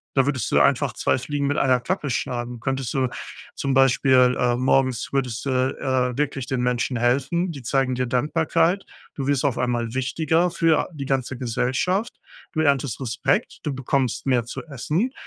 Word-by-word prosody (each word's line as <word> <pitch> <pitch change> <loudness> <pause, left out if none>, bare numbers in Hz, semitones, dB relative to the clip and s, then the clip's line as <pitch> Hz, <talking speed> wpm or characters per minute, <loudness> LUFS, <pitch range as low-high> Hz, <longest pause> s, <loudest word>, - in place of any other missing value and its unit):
Da 135 -2 +4
würdest 135 -7 -1
du - - +4
einfach - - +3
2 130 - 0
Fliegen 140 +2 -2
mit 145 - 0
einer 130 -2 +3
Klappe 150 +3 -2
schlagen. 120 -1 -3
Könntest 135 -1 -2
du 130 -2 +1 0.5
zum 135 -1 -1
Beispiel 130 -1 +4
äh, 120 -1 +2
morgens 130 -1 +1
würdest 130 -3 -1
du, 140 - -1
äh, 130 -1 0
wirklich 135 -3 -2
den 130 -2 -1
Menschen 125 0 0
helfen, 135 +9 +1
die 140 -4 -8
zeigen 130 +1 0
dir 125 0 -1
Dankbarkeit. 160 +8 +1 0.3
Du 135 -2 -4
wirst 140 -1 +1
auf 135 -4 0
einmal 120 -2 -1
wichtiger 160 +6 +1
für 165 -2 +2
a - - -1
die 140 -2 -5
ganze 130 -1 -1
Gesellschaft. 130 - -1 0.4
Du 155 - -2
erntest 140 -5 +1
Respekt, 130 +2 -1
du 150 - -2
bekommst 130 -2 -1
mehr 125 -4 +2
zu 120 - -6
essen, 155 - -1
130 Hz, 175 wpm, -23 LUFS, 125-145 Hz, 0.5 s, Da